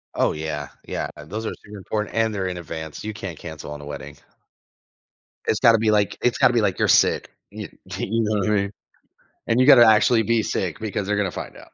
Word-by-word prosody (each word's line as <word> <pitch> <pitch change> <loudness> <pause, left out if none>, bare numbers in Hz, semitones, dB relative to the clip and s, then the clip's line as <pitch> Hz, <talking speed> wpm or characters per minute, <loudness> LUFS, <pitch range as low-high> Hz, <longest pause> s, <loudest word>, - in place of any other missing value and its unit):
Oh, - - +2
yeah, 75 -2 -4 0.2
yeah. - - -3 0.2
Those 110 +8 -5
are - - -2
super 105 0 -11
important 105 +2 -4
and 115 -1 +1
they're 95 -2 -2
in 90 -1 -4
advance. 80 -2 -7
You 110 0 -4
can't 95 -6 -7
cancel 80 -3 -8
on 75 0 -7
a - - -10
wedding. 75 0 -8 1.3
It's 110 - +1
gotta 115 -3 +6
be, 110 0 +2
like 105 -1 +1
it's 125 - +1
gotta 130 -3 +4
be, 120 - +3
like, 95 -3 0
you're - - +3
sick, - - +3 0.2
you - - -8 0.3
you 115 +3 -1
know 105 -1 0
what 100 - 0
I 105 - +3
mean. 100 -1 0 0.7
And 115 +2 +1
you 130 - +4
got 145 - +10
to 120 -2 +8
actually 110 +1 +5
be 115 +1 +2
sick 90 -5 -3
because 105 -2 -3
they're 105 +1 0
going 100 -1 +1
to - - -5
find - - -7
out. - - -15
105 Hz, 235 wpm, -23 LUFS, 85-110 Hz, 1.3 s, got